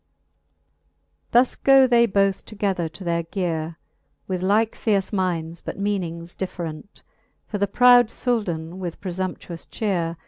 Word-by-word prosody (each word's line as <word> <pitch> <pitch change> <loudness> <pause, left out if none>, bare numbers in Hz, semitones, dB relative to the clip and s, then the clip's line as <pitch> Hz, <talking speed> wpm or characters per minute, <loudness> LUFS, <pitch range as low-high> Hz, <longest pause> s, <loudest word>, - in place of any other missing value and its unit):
Thus 245 +2 +4
go 270 -1 +6
they 235 -2 +4
both 195 -1 +1
together 195 -6 -2
to 190 - -11
their 170 -1 0
geare, 165 -3 -3 0.5
With 185 -2 -2
like 210 +4 +2
fierce 200 -2 0
minds, 170 -4 -2
but - - -6
meaning 180 -5 -2
different: 175 -1 -6 0.4
For 205 - -4
the 200 - +2
proud 245 +2 +6
Souldan 185 -10 -2
with 175 -3 -5
prefumptuous 180 -2 -5
chearc. 170 -6 -1
190 Hz, 130 wpm, -23 LUFS, 170-210 Hz, 0.5 s, go